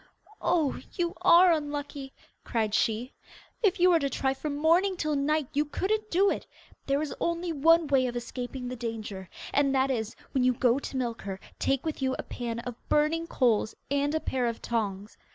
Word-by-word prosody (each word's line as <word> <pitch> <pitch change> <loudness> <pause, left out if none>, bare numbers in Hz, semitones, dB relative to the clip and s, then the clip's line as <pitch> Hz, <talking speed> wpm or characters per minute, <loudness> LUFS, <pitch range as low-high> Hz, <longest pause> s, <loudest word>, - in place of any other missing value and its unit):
'Oh, 330 -5 +1
you 345 -1 -1
are 350 +1 +7
unlucky,' 290 -3 -3 0.3
cried 220 -3 -1
she. 225 +4 0 0.5
'If 410 -3 +2
you 360 +1 +6
were 335 - +5
to 280 -2 0
try 265 0 0
from 285 +2 -4
morning 345 +6 +3
till 305 -3 0
night 295 0 +1
you 290 +1 +2
couldn't 425 +8 -2
do 390 +3 +3
it. - - -4 0.4
There 280 +2 +1
is 305 - -4
only 340 0 -1
one 330 +3 +5
way 270 -3 +3
of 245 - -4
escaping 245 +1 -5
the 250 - -4
danger, 215 -6 -5 0.2
and 275 -1 +3
that 265 +1 +2
is, 220 -4 -2 0.2
when 260 - +1
you 255 0 +4
go 245 +1 +2
to 275 - -5
milk 240 -3 -2
her, 195 -1 -5 0.2
take 275 +1 0
with 315 -3 -3
you 260 0 +1
a - - -4
pan 235 -2 -5
of 245 0 -5 0.2
burning 320 +3 +2
coals 230 -7 +1 0.2
and 285 +2 +1
a - - +2
pair 255 -5 -1
of 230 -1 -3
tongs. 210 -3 -3
275 Hz, 195 wpm, -28 LUFS, 245-320 Hz, 0.5 s, are